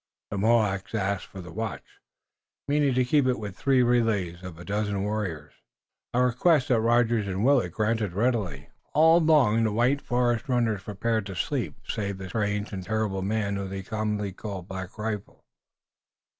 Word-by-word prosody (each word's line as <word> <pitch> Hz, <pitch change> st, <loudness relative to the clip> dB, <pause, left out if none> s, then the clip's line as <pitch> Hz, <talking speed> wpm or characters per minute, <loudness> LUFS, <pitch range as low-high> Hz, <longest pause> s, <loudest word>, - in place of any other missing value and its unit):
The 100 Hz, -, -2 dB
Mohawks 105 Hz, -2 st, +2 dB
asked 100 Hz, -2 st, -1 dB
for 95 Hz, -, -9 dB
the 90 Hz, -2 st, -10 dB
watch, 110 Hz, 0 st, -6 dB, 0.7 s
meaning 145 Hz, -2 st, +2 dB
to 130 Hz, 0 st, +3 dB
keep 140 Hz, +1 st, +3 dB
it 125 Hz, -, +1 dB
with 105 Hz, -3 st, -6 dB
three 135 Hz, -2 st, +3 dB
relays 110 Hz, -8 st, +1 dB
of 90 Hz, -3 st, -8 dB
a 90 Hz, -, -10 dB
dozen 100 Hz, -1 st, -1 dB
warriors 100 Hz, -8 st, -3 dB
each, -, -, -34 dB, 0.5 s
a 125 Hz, -, +4 dB
request 130 Hz, +3 st, +3 dB
that 120 Hz, -3 st, +3 dB
Rogers 115 Hz, -2 st, +2 dB
and 95 Hz, +3 st, -1 dB
Willet 130 Hz, -10 st, +3 dB
granted 110 Hz, -2 st, 0 dB
readily, 105 Hz, -, 0 dB
and 70 Hz, +1 st, -15 dB, 0.3 s
all 160 Hz, +2 st, +6 dB
the 115 Hz, -9 st, +4 dB
white 125 Hz, +6 st, +2 dB
forest 120 Hz, 0 st, 0 dB
runners 115 Hz, -5 st, +1 dB
prepared 110 Hz, +2 st, -2 dB
for 95 Hz, -, -6 dB
sleep, 100 Hz, -, -2 dB
save 100 Hz, -2 st, -3 dB
the 95 Hz, -1 st, -7 dB
strange 105 Hz, 0 st, -2 dB
and 95 Hz, -1 st, -4 dB
terrible 105 Hz, -1 st, -1 dB
man 100 Hz, 0 st, -1 dB
whom 100 Hz, -1 st, -4 dB
they 95 Hz, 0 st, -5 dB
commonly 105 Hz, -1 st, -2 dB
called 95 Hz, -2 st, -7 dB
Black 95 Hz, +1 st, -7 dB
Rifle. 105 Hz, -2 st, -5 dB
110 Hz, 170 wpm, -27 LUFS, 95-120 Hz, 0.7 s, all